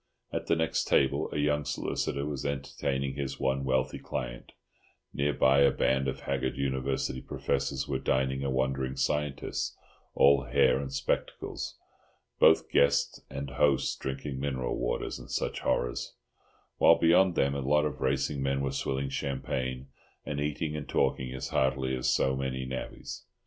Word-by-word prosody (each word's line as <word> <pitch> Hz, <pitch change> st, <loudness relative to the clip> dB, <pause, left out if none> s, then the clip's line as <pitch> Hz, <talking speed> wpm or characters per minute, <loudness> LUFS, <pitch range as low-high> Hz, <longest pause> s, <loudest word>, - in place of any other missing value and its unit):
At -, -, -3 dB
the -, -, +3 dB
next 80 Hz, -1 st, 0 dB
table 70 Hz, +3 st, +2 dB
a -, -, -3 dB
young 75 Hz, 0 st, +1 dB
solicitor 70 Hz, 0 st, -2 dB
was 75 Hz, -3 st, -4 dB
entertaining 70 Hz, -1 st, -2 dB
his 70 Hz, -1 st, -4 dB
one 65 Hz, 0 st, 0 dB
wealthy 65 Hz, -1 st, 0 dB
client; -, -, -5 dB, 0.6 s
near 70 Hz, +1 st, +1 dB
by 70 Hz, 0 st, +4 dB
a 70 Hz, -1 st, +7 dB
band 65 Hz, 0 st, +1 dB
of 65 Hz, -, -3 dB
haggard 65 Hz, -2 st, -2 dB
University 65 Hz, -1 st, -1 dB
professors 70 Hz, -1 st, -2 dB
were 65 Hz, -2 st, -1 dB
dining 65 Hz, +1 st, 0 dB
a 70 Hz, -, 0 dB
wandering 65 Hz, 0 st, 0 dB
scientist, 70 Hz, +1 st, -1 dB, 0.4 s
all 70 Hz, -1 st, +5 dB
hair -, -, +3 dB
and 70 Hz, -1 st, -5 dB
spectacles—both 70 Hz, -, -1 dB
guest 70 Hz, 0 st, +3 dB
and 70 Hz, 0 st, -5 dB
hosts 70 Hz, 0 st, +2 dB
drinking 65 Hz, 0 st, -4 dB
mineral 65 Hz, -3 st, -2 dB
waters -, -, -2 dB
and -, -, -12 dB
such -, -, -2 dB
horrors; -, -, -1 dB, 0.6 s
while 85 Hz, -, +7 dB
beyond 85 Hz, +2 st, +4 dB
them 70 Hz, -2 st, +2 dB
a 70 Hz, -, -2 dB
lot 75 Hz, +3 st, +2 dB
of 70 Hz, -3 st, -4 dB
racing 70 Hz, +1 st, 0 dB
men 70 Hz, 0 st, 0 dB
were 70 Hz, -1 st, -1 dB
swilling 70 Hz, 0 st, -2 dB
champagne 65 Hz, -1 st, -3 dB, 0.4 s
and 75 Hz, -1 st, -3 dB
eating 75 Hz, +1 st, -2 dB
and 75 Hz, -2 st, -6 dB
talking 65 Hz, -1 st, +1 dB
as 65 Hz, -, -5 dB
heartily 65 Hz, 0 st, +1 dB
as 65 Hz, -, 0 dB
so 65 Hz, 0 st, +2 dB
many 65 Hz, -1 st, -3 dB
navvies. 65 Hz, 0 st, -6 dB
70 Hz, 155 wpm, -29 LUFS, 65-70 Hz, 0.6 s, a